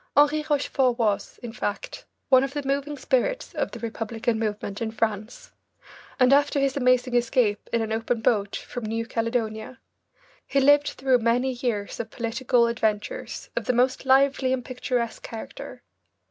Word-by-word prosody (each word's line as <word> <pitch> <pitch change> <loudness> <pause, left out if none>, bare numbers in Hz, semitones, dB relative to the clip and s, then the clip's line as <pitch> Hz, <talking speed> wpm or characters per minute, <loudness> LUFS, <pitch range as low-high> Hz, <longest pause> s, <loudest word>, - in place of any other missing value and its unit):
Henri 295 +1 +5
Rochefort 270 -4 +1
was, 215 -4 -1
in 235 -2 -6
fact, 205 -4 -4 0.2
one 260 -1 +6
of 275 0 -3
the 290 - -2
moving 280 +2 -1
spirits 275 - 0
of - - -1
the - - -8
Republican 225 0 -2
movement 210 -2 -3
in 225 - -1
France, 220 0 -3 0.7
and 255 +1 +6
after 285 0 +3
his 275 -1 +1
amazing 255 -2 +2
escape 240 -3 +1
in 230 -1 +1
an 220 - -4
open 225 +1 -1
boat 205 -3 +1
from 245 - -6
New 225 +1 -2
Caledonia, 230 0 -2 0.7
he 275 - +2
lived 290 +2 +5
through 260 -1 +2
many 240 +3 +1
years 240 -5 -3
of 225 - -4
political 235 +1 +1
adventures 215 -3 -2
of - - -2
the 250 - +1
most 255 +2 +2
lively 270 0 +3
and 260 -2 -1
picturesque 250 -2 -2
character. 225 - -8
245 Hz, 160 wpm, -25 LUFS, 225-265 Hz, 0.7 s, one